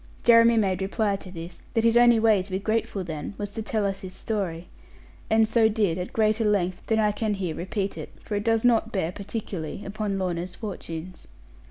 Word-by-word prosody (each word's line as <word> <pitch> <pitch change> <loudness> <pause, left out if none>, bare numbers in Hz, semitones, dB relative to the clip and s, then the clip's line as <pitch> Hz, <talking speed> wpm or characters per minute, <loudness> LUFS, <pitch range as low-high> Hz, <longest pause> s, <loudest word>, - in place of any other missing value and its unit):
Jeremy 230 0 +6
made 190 -3 +1
reply 200 +1 0
to 190 - -11
this 170 -1 -8 0.2
that 225 - +3
his 230 0 +4
only 240 -1 +6
way 220 -3 +4
to 190 - -8
be 185 - 0
grateful 215 -1 -1
then 160 +3 -6
was 205 -1 -4
to 220 - -4
tell 215 -1 -1
us 195 -1 -2
his 185 -1 -8
story: 180 -6 -3 0.6
and 220 0 +4
so 225 0 +3
he - - +5
did, 205 -6 0
at 180 - -4
greater 220 0 +2
length 185 -4 0
than 220 - +2
I 210 -1 +3
can 210 0 -1
here 185 -4 -3
repeat 195 +3 -3
it; - - -7
for - - -7
it 205 0 0
does 225 +1 +2
not 235 -2 +3
bear 180 -4 -1
particularly 195 -3 -5
upon 200 0 -2
Lorna's 180 -1 -3
fortunes. 180 -4 -7
205 Hz, 210 wpm, -26 LUFS, 185-220 Hz, 0.6 s, Jeremy